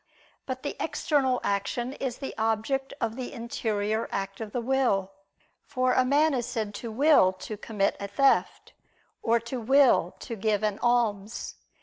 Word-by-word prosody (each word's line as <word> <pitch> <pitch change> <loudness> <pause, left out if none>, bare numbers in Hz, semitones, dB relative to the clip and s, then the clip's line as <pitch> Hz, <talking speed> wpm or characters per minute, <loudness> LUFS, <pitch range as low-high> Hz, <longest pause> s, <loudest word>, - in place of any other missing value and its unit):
But 260 -1 -4
the 290 - -3
external 275 -5 +1
action 235 +6 -1
is 260 -3 -4
the 270 - -6
object 225 +5 -1
of 225 -1 -1
the 255 -1 -5
interior 220 -2 -2
act 195 +1 -4
of 215 -2 -5
the 245 - -2
will: 235 -6 +1 0.5
for 255 -2 0
a 255 - +4
man 290 +4 +3
is 245 -2 -1
said 220 -4 -3
to 230 - -5
will 275 -5 +5
to 200 +3 -7
commit 205 -1 -1
a 200 - -4
theft, 270 +7 +1 0.5
or 230 +1 +2
to 235 +2 -5
will 255 -7 +4
to 235 - -5
give 215 0 0
an 210 -1 0
alms. 225 -3 0
235 Hz, 160 wpm, -27 LUFS, 210-260 Hz, 0.5 s, will